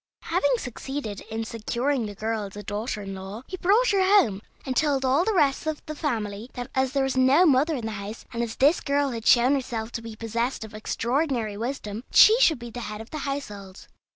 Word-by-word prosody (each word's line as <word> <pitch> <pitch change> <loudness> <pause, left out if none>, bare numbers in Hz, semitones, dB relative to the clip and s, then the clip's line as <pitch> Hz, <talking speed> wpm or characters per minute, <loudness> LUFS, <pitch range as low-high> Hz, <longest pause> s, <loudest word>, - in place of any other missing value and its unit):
Having 285 -7 +1
succeeded 250 -3 -5
in 225 0 -3
securing 235 +3 -1
the 205 - -8
girl 220 0 -2
as 195 - -10
a 205 - -7
daughter 210 +1 -4
in 195 0 -6
law, 195 +5 -8
he 370 - -6
brought 425 +8 +3
her 395 -1 +3
home, 375 - +4 0.2
and 260 -2 -2
told 280 -3 +1
all 270 +6 +3
the 440 - +1
rest 300 -6 +2
of 310 -1 -3
the 305 - -5
family 225 -7 -3
that 245 +1 -6
as 265 0 0
there 275 -1 +2
was 270 -1 -1
no 265 +7 +5
mother 300 +1 +3
in 240 -5 -4
the 220 - -3
house, 205 +2 -7
and 235 - -2
as 230 -1 -3
this 290 +6 +3
girl 280 -1 +1
had 230 -2 -5
shown 245 +3 +6
herself 240 -5 -3
to 230 - -5
be 225 -1 -8
possessed 230 +3 -2
of 220 0 -10
extraordinary 235 +1 -1
wisdom, 225 -1 -4
she 435 - +8
should 325 - +5
be 240 -1 -9
the 245 - -6
head 210 -2 -6
of 225 - -10
the 310 - -4
household. 205 -9 -7
245 Hz, 225 wpm, -25 LUFS, 220-285 Hz, 0.2 s, she